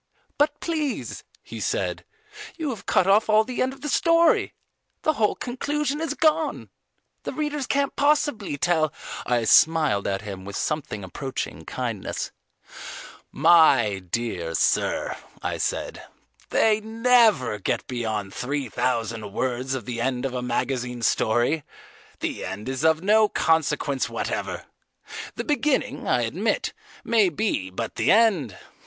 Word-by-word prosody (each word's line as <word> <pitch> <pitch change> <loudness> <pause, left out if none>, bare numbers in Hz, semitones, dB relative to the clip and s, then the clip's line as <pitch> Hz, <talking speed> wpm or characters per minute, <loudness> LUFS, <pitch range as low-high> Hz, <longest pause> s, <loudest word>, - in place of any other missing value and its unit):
"But 295 0 +2
please," 310 -5 -3 0.2
he - - -8
said, - - -2 0.5
"you 315 -5 -2
have 225 - -8
cut - - +3
off 205 +3 +4
all 215 0 +5
the 250 +2 -4
end 255 - +1
of 270 0 -13
the 295 - -4
story: 335 +2 +3 0.5
the 310 - +3
whole 215 -7 +1
conclusion 290 +4 -2
is 325 - -2
gone. 315 0 +1 0.5
The - - -5
readers 295 -3 -2
can't 280 0 0
possibly 285 - +1
tell, 155 -1 +2 0.2
" - - -7
I 120 -2 +2
smiled 155 -4 +4
at 95 +1 -2
him 95 -3 -7
with 100 0 -7
something 145 -9 -3
approaching 130 +9 -5
kindness. - - -4 1.0
"My 130 - +5
dear 90 -3 -3
sir," - - +1 0.3
I - - -2
said, - - -2 0.5
"they 220 -1 +3
never 220 - +3
get - - -1
beyond 110 -5 -3
three 135 0 -3
thousand 115 -2 -2
words 130 +3 -2
of 125 -5 -5
the 120 -2 -4
end 125 0 -1
of 135 - -2
a 125 - -2
magazine 125 0 -2
story. 120 +8 +2 0.6
The - - -3
end 105 - -6
is 130 +2 -3
of 160 +1 +3
no 215 +1 +4
consequence 155 -4 +1
whatever. - - -3 0.7
The - - -3
beginning, 295 -2 0
I - - +2
admit, - - -1 0.3
may 220 -5 +3
be, 155 - -1
but 110 +4 -5
the - - +3
end! 195 - +3
155 Hz, 140 wpm, -24 LUFS, -, 1.0 s, all